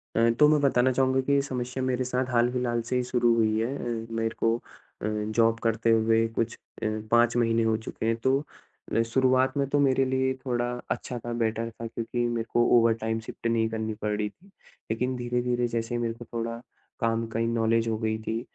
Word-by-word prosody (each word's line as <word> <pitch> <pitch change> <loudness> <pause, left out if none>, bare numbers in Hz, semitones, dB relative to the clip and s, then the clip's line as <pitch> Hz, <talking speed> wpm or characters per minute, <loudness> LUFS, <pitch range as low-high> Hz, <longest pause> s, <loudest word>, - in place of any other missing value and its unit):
अ, 115 +1 +4
तो 150 - +8
मैं 150 -1 +4
बताना 130 -2 +3
चाहूँगा 130 +1 +2
कि 140 - -2
ये 140 - +4
समस्या 125 -1 -4
मेरे 130 0 0
साथ 125 +1 0
हाल-फिलहाल 120 0 +1
से 125 - 0
ही 125 - +1
शुरू 120 -1 +2
हुई 110 -1 +2
है। 125 +5 -1
अ, 115 -1 -4
मेरे 115 0 -1
को 115 +1 +2 0.4
अ, 105 - -1
जॉब 110 +2 +1
करते 115 0 +1
हुए 115 0 +3
कुछ 115 0 0 0.3
अ, - - 0 0.3
5 120 0 +4
महीने 115 -1 +2
हो 110 0 +2
चुके 110 0 -6
हैं। 115 0 +2
तो 130 +4 +1 0.6
अ, 115 - +4
शुरुआत 130 +3 +2
में 140 -1 +1
तो 145 - +2
मेरे 135 -1 +3
लिए 130 0 +1
थोड़ा 120 -1 0 0.2
अच्छा 125 - -3
था, 120 +1 -5
बेटर 115 0 -1
था 115 +1 -7
क्योंकि 120 +1 -2
मेरे 115 -1 -2
को 120 0 +4
ओवरटाइम 115 -1 +2
शिफ्ट 115 - -5
नहीं 115 -1 +2
करनी 110 -1 -3
पड़ 105 0 0
रही 105 -1 -1
थी। 175 - -24 0.4
लेकिन 125 +3 -1
धीरे-धीरे 120 0 0
जैसे 115 0 -2
ही 120 - -1
मेरे 115 -1 -1
को 120 0 -11
थोड़ा 115 0 -3 0.4
काम 115 -1 0
का 115 0 -4
इ 115 - +1
नॉलेज 115 0 +1
हो 110 -1 0
गई 110 -1 -1
थी, 110 +1 -2
115 Hz, 215 wpm, -27 LUFS, 115-125 Hz, 0.6 s, तो